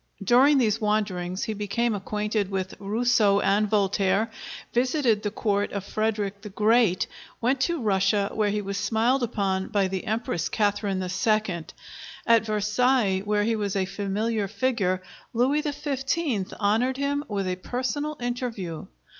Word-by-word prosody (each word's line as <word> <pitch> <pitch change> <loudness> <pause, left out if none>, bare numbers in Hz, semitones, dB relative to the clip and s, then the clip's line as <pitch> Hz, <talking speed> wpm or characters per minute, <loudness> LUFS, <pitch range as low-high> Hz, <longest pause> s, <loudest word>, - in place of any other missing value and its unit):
During 260 +8 +5
these 225 -3 +2
wanderings 195 -4 -1
he 220 - -2
became 215 +3 -1
acquainted 210 0 -2
with 190 -1 -3
Rousseau 210 0 +2
and 205 +1 +2
Voltaire; 200 +1 +1 0.4
visited 245 -3 +2
the 210 - -1
court 205 -1 -1
of 200 -2 -3
Frederick 205 -1 -2
the 210 - -8
Great; 215 -2 +3 0.3
went 255 +3 +1
to 340 -2 +1
Russia, 200 -2 +1
where 215 -1 +1
he 210 0 -1
was 200 0 -3
smiled 240 +4 +1
upon 195 -5 -1
by 200 -2 +1
the 190 0 -4
Empress 215 -7 -1
Catharine 205 -3 0
II. 185 -2 0 0.6
At 230 -1 +4
Versailles, 210 0 +2
where 205 +1 0
he 225 +1 +1
was 205 -2 -2
a 190 -1 +1
familiar 205 +2 -2
figure, 200 -4 0 0.3
Louis 265 +6 +2
XV. 280 - -2
honored 225 +5 +1
him 285 +1 -1
with 200 -3 -2
a 180 0 -2
personal 280 +8 -3
interview. 240 -9 -4
210 Hz, 145 wpm, -26 LUFS, 195-240 Hz, 0.6 s, During